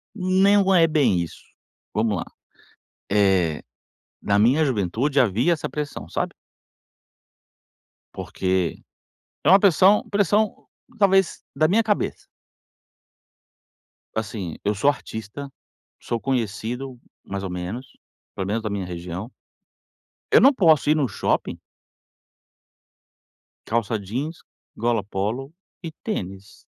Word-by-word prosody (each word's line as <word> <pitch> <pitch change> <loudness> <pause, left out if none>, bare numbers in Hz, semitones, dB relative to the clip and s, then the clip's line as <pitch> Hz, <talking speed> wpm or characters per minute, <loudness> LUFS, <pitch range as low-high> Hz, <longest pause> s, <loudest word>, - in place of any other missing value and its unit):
Não 195 +1 +3
é 165 -2 +6
bem 140 - +2
isso. 85 - -7 0.5
Vamos 105 -1 +1
lá! - - -4 0.9
Eh, 95 -6 +2 0.6
na 100 0 +2
minha 130 +9 +4
juventude 125 +4 0
havia 120 - +2
essa 160 - -2
pressão, 150 -2 -5
sabe? - - -2 1.8
Porque, 95 -2 -2 0.6
é - - +3
uma 195 +2 +8
pressão 195 +1 +5
pressão, 205 +1 +1 0.3
talvez, 195 -2 +3
da 155 +3 +3
minha 220 +5 +3
cabeça. 210 -2 -1 1.9
Assim, 105 -6 -4
eu 105 - +2
sou 110 +8 +2
artista, 135 +1 -5 0.5
sou 120 - -3
conhecido, 125 +1 -3 0.2
mais 100 0 -5
ou 95 - -3
menos, 90 +8 -5 0.5
pelo 95 - -3
menos 110 +3 -1
da 110 - -2
minha 100 -2 -3
região 90 +5 -6 1.0
eu - - +8
não 275 +2 +7
posso 160 - +4
ir 155 - +5
num 145 -4 +1
shopping? 100 - -1 2.1
Calça 115 0 0
jeans, 135 - -4 0.4
gola 115 -2 +1
polo 110 +9 -3 0.3
e 165 - -5
tênis 95 - -5
120 Hz, 110 wpm, -23 LUFS, 100-160 Hz, 2.1 s, uma